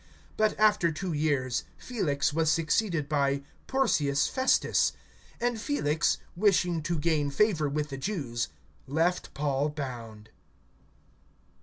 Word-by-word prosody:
(27)But 215 Hz, 0 st, +3 dB
after 210 Hz, -6 st, +4 dB
two 175 Hz, +2 st, -4 dB
years, 145 Hz, -5 st, 0 dB
Felix 145 Hz, -, -1 dB
was 160 Hz, 0 st, +2 dB
succeeded 165 Hz, 0 st, +1 dB
by 140 Hz, -2 st, +1 dB, 0.2 s
Porcius 150 Hz, -, +2 dB
Festus; 260 Hz, 0 st, +2 dB, 0.5 s
and 240 Hz, -2 st, -1 dB
Felix, 170 Hz, -, +1 dB, 0.2 s
wishing 180 Hz, -3 st, +2 dB
to 170 Hz, +2 st, -1 dB
gain 150 Hz, -2 st, +1 dB
favor 155 Hz, -1 st, +2 dB
with 150 Hz, +1 st, -2 dB
the 135 Hz, -, -5 dB
Jews, 135 Hz, -, -2 dB, 0.4 s
left 165 Hz, +6 st, 0 dB
Paul 140 Hz, 0 st, 0 dB
bound. 120 Hz, -7 st, -7 dB
155 Hz, 115 wpm, -28 LUFS, 140-185 Hz, 0.5 s, after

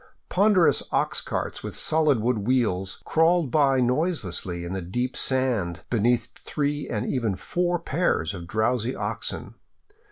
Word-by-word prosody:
Ponderous 195 Hz, -2 st, +4 dB
ox -, -, +1 dB
carts -, -, -3 dB
with -, -, -6 dB
solid 155 Hz, -6 st, +2 dB
wooden 115 Hz, -2 st, 0 dB
wheels 100 Hz, -6 st, 0 dB
crawled 165 Hz, -3 st, +3 dB
by 135 Hz, -3 st, +3 dB
noiselessly 120 Hz, -, -1 dB
in 85 Hz, -, -4 dB
the 95 Hz, -, -3 dB
deep 125 Hz, +9 st, -3 dB
sand 120 Hz, -10 st, 0 dB
behind 120 Hz, +1 st, +2 dB
three 145 Hz, 0 st, -2 dB
and 105 Hz, +2 st, -2 dB
even 115 Hz, -8 st, -1 dB
four 175 Hz, -, -1 dB
pairs 160 Hz, -, 0 dB
of 85 Hz, -3 st, -7 dB
drowsy 115 Hz, +4 st, 0 dB
oxen. -, -, -3 dB
125 Hz, 135 wpm, -25 LUFS, 105-150 Hz, -, Ponderous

